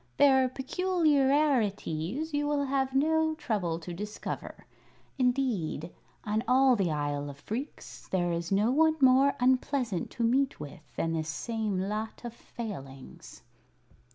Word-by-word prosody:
"Their 265 Hz, -2 st, +5 dB
peculiarities 275 Hz, -, +1 dB
you 290 Hz, 0 st, 0 dB
will 290 Hz, -1 st, +1 dB
have 265 Hz, -1 st, -1 dB
no 315 Hz, +2 st, +2 dB
trouble 195 Hz, -, -2 dB
to 175 Hz, +1 st, -7 dB
discover. 210 Hz, +4 st, -6 dB, 0.5 s
Indeed, 240 Hz, -, 0 dB, 0.3 s
on 215 Hz, +1 st, -1 dB
all 260 Hz, 0 st, +5 dB
the 195 Hz, -6 st, 0 dB
Isle 145 Hz, -1 st, -2 dB
of 140 Hz, -, -9 dB
Phreex, 250 Hz, +7 st, -6 dB
there 175 Hz, -2 st, 0 dB
is 170 Hz, +1 st, -3 dB
no 205 Hz, +4 st, +3 dB
one 315 Hz, +3 st, +4 dB
more 270 Hz, +1 st, +5 dB
unpleasant 250 Hz, -, +1 dB
to 235 Hz, -, -2 dB
meet 265 Hz, +4 st, +1 dB
with 150 Hz, +1 st, -11 dB
than 165 Hz, 0 st, -1 dB
this 160 Hz, -1 st, -2 dB
same 215 Hz, +2 st, -2 dB
lot 215 Hz, +5 st, -4 dB
of 235 Hz, -, -5 dB
Failings." 140 Hz, -, -9 dB
235 Hz, 130 wpm, -29 LUFS, 175-275 Hz, 0.5 s, Their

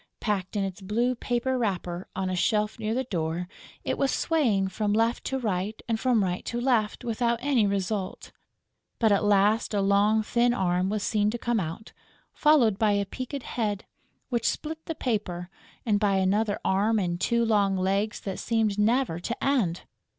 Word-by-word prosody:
Packed 200 Hz, -2 st, -2 dB
in 200 Hz, -, +1 dB
its 195 Hz, 0 st, -5 dB
blue 230 Hz, +6 st, 0 dB
paper 250 Hz, +1 st, -1 dB
wrapper, 180 Hz, -5 st, -2 dB
on 190 Hz, 0 st, -1 dB
a 185 Hz, -, -1 dB
shelf 210 Hz, +4 st, 0 dB
near 220 Hz, +1 st, -1 dB
the 260 Hz, -, 0 dB
door, 170 Hz, -5 st, -3 dB, 0.4 s
it -, -, -2 dB
was 275 Hz, -, +2 dB
swaying 240 Hz, -13 st, +1 dB
from 205 Hz, +2 st, -1 dB
left 230 Hz, +2 st, +1 dB
to 265 Hz, -, -1 dB
right 210 Hz, -3 st, -2 dB
and 225 Hz, -2 st, 0 dB
from 245 Hz, -4 st, +2 dB
right 180 Hz, -1 st, -2 dB
to 240 Hz, -, -3 dB
left 240 Hz, -4 st, +1 dB
without 235 Hz, 0 st, 0 dB
any 250 Hz, -6 st, +2 dB
result. 195 Hz, 0 st, -3 dB, 0.7 s
But 220 Hz, -2 st, +3 dB
at 200 Hz, -, +3 dB
last 210 Hz, +2 st, +3 dB
a -, -, +2 dB
long 205 Hz, +2 st, +3 dB
thin 240 Hz, +2 st, +2 dB
arm 180 Hz, -2 st, +1 dB
was 210 Hz, 0 st, -1 dB
seen 210 Hz, -1 st, +1 dB
to 235 Hz, -, -3 dB
come 235 Hz, -1 st, 0 dB
out, 170 Hz, +5 st, -6 dB, 0.4 s
followed 250 Hz, -10 st, +4 dB
by 215 Hz, -2 st, +3 dB
a 200 Hz, 0 st, +1 dB
peaked 255 Hz, +5 st, -6 dB
head, 210 Hz, -4 st, -2 dB, 0.4 s
which 235 Hz, -3 st, +1 dB
split 320 Hz, +1 st, -5 dB
the 325 Hz, -, -3 dB
paper, 190 Hz, -9 st, -3 dB, 0.3 s
and 210 Hz, -3 st, +2 dB
by 200 Hz, -2 st, +2 dB
another 205 Hz, +3 st, +1 dB
arm 205 Hz, +4 st, +2 dB
and 175 Hz, -3 st, -1 dB
two 235 Hz, 0 st, +2 dB
long 200 Hz, -3 st, +2 dB
legs 195 Hz, +3 st, 0 dB
that 195 Hz, -2 st, -5 dB
seemed 220 Hz, -3 st, 0 dB
never 225 Hz, -4 st, +2 dB
to 235 Hz, +7 st, -5 dB
end!... 225 Hz, -12 st, +1 dB
210 Hz, 180 wpm, -27 LUFS, 195-235 Hz, 0.7 s, followed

